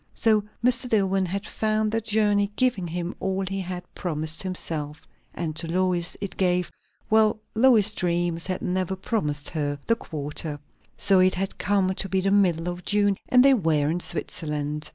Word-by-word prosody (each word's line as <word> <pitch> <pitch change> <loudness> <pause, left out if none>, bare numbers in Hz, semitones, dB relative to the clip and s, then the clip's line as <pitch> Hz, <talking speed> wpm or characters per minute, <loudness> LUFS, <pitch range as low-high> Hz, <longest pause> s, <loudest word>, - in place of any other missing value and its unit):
So 215 -2 +3 0.2
Mr. 250 0 +2
Dillwyn 195 -3 +2
had 200 +4 -3
found 215 0 0
the 225 +1 0
journey 205 -2 +2
giving 245 -9 +1
him 175 +2 -4
all 190 0 -1
he 195 +1 -3
had 180 -1 -5
promised 155 -3 -3
himself; 160 -5 -4 0.3
and 160 -3 -3
to 165 +1 -4
Lois 180 0 +1
it 200 -1 -5
gave 180 -1 +1 0.4
well 220 0 +4 0.2
Lois's 220 -3 +4
dreams 175 -2 -1
had 185 -1 -3
never 185 +1 -1
promised 150 -8 -2
her 145 -3 -2
the 230 - +3
quarter. 150 -5 -5 0.4
So 195 -1 +5
it 185 0 +4
had 190 +1 -3
come 190 -1 +1
to 195 - -3
be 190 - +1
the 195 +1 +1
middle 180 -5 +2
of 175 0 -4
June, 205 0 +2
and 250 +1 +6
they 275 - +7
were 160 - +1
in 175 - -1
Switzerland. 150 -3 -3
185 Hz, 175 wpm, -25 LUFS, 165-205 Hz, 0.4 s, they